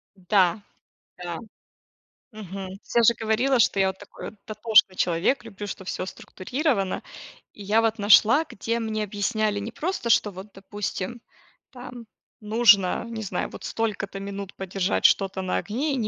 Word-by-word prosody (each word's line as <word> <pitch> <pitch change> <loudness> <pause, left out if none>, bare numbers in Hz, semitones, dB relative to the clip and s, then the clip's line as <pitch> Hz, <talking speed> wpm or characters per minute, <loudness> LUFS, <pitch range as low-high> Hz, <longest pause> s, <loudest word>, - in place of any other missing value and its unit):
Да. 190 +1 +2 0.6
Да. 170 -2 -4 0.9
Мгм. 195 -3 -7 0.2
Всё 235 - +2
же 235 - +6
говорила, 235 +4 +2
что 200 -3 +3
я 190 - +4
вот 190 - -3
такой - - -9
дотошный 215 -2 +3
человек, 180 +11 +1
люблю, 205 -2 -8
чтоб 190 -1 -7
всё 185 - -3
структурировано. 195 - -2 0.5
И 205 - -11
я 215 +3 +3
вот 225 0 +1
нашла, 220 +8 +6
где 230 -2 -3
мне 220 -1 -2
объясняли 210 +1 -1
не 210 +3 -5
просто 325 -3 -3
что, 210 - +3
вот, 190 +3 -9
допустим, 205 +3 -5 0.5
там 245 -2 -10 0.4
нужно, 215 -3 +4
не 225 -2 -5
знаю, 195 - -3
вот - - -11
столько-то 205 -3 -3
минут 200 0 -6
подержать 190 0 -1
что-то 195 -1 +3
на 185 - -1
огне, 275 +8 -2
и - - 0
ни 220 - -1
210 Hz, 155 wpm, -25 LUFS, 195-230 Hz, 0.9 s, же